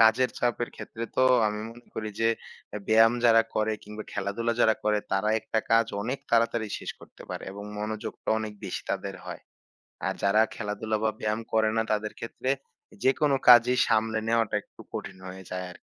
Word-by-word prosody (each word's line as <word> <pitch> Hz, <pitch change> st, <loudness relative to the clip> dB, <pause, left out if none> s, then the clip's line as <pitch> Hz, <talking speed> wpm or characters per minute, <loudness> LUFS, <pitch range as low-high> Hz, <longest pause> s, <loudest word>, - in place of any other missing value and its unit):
কাজের 115 Hz, +3 st, +5 dB
চাপের 120 Hz, -1 st, 0 dB
ক্ষেত্রে 115 Hz, 0 st, -6 dB
তো 130 Hz, -, +4 dB, 0.2 s
আমি 105 Hz, 0 st, -2 dB
মনে 120 Hz, +1 st, -15 dB
করি 110 Hz, -1 st, -3 dB
যে, 115 Hz, -, +4 dB, 0.4 s
এ্যা -, -, -5 dB
ব্যায়াম 115 Hz, +1 st, +6 dB
যারা 115 Hz, -1 st, +7 dB
করে 110 Hz, 0 st, +1 dB
কিংবা 105 Hz, +1 st, -8 dB
খেলাধুলা 115 Hz, +4 st, -1 dB
যারা 110 Hz, -1 st, +5 dB
করে, 105 Hz, 0 st, +3 dB
তারা 95 Hz, +2 st, +2 dB
একটা 110 Hz, -, -1 dB
কাজ 115 Hz, 0 st, +5 dB, 0.2 s
অনেক 125 Hz, +5 st, -2 dB
তাড়াতাড়ি 115 Hz, -1 st, +2 dB
শেষ -, -, -5 dB
করতে -, -, -14 dB
পারে -, -, -5 dB
এবং 100 Hz, +1 st, -8 dB
মনোযোগটা 105 Hz, 0 st, -5 dB
অনেক 110 Hz, -1 st, -4 dB
বেশি -, -, -4 dB
তাদের -, -, -3 dB
হয়। -, -, -7 dB, 0.7 s
আর -, -, 0 dB
যারা 100 Hz, +2 st, +5 dB
খেলাধুলা 105 Hz, +1 st, -2 dB
বা 110 Hz, -, +3 dB
ব্যায়াম 110 Hz, +1 st, 0 dB
করে 110 Hz, -1 st, +4 dB
না, -, -, +4 dB
তাদের 105 Hz, 0 st, -1 dB
ক্ষেত্রে, 120 Hz, +3 st, -4 dB, 0.5 s
যেকোনো 140 Hz, +1 st, +3 dB
কাজই 125 Hz, +1 st, +8 dB
সামলে 110 Hz, 0 st, +2 dB
নেওয়াটা 115 Hz, -2 st, +2 dB
একটু -, -, -16 dB
কঠিন -, -, -5 dB
হয়ে 95 Hz, +1 st, -9 dB
যায় 90 Hz, 0 st, -3 dB
আর -, -, -13 dB
110 Hz, 180 wpm, -27 LUFS, 105-115 Hz, 0.7 s, কাজই